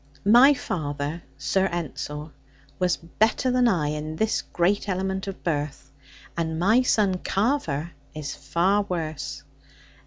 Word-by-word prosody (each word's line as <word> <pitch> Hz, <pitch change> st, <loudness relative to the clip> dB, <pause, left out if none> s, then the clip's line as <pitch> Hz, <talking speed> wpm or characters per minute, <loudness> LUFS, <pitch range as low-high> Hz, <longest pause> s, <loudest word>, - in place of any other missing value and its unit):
My 245 Hz, +7 st, +7 dB
father, 150 Hz, -, -3 dB, 0.2 s
Sir 190 Hz, +7 st, +1 dB
Ensor, 155 Hz, -3 st, -5 dB, 0.5 s
was 180 Hz, -1 st, +2 dB
better 220 Hz, +9 st, +1 dB
than 250 Hz, -1 st, +4 dB
I 165 Hz, -9 st, +2 dB
in 150 Hz, +1 st, -4 dB
this 220 Hz, +6 st, +1 dB
great 195 Hz, +4 st, 0 dB
element 190 Hz, +1 st, -2 dB
of 195 Hz, -, -7 dB
birth, 145 Hz, -4 st, -3 dB, 0.4 s
and 160 Hz, -1 st, -2 dB
my 215 Hz, +9 st, +4 dB
son 205 Hz, -7 st, +2 dB
Carver 185 Hz, -, 0 dB, 0.2 s
is 150 Hz, -3 st, -4 dB
far 170 Hz, +9 st, +1 dB
worse. 160 Hz, -4 st, -4 dB
175 Hz, 125 wpm, -25 LUFS, 150-205 Hz, 0.5 s, My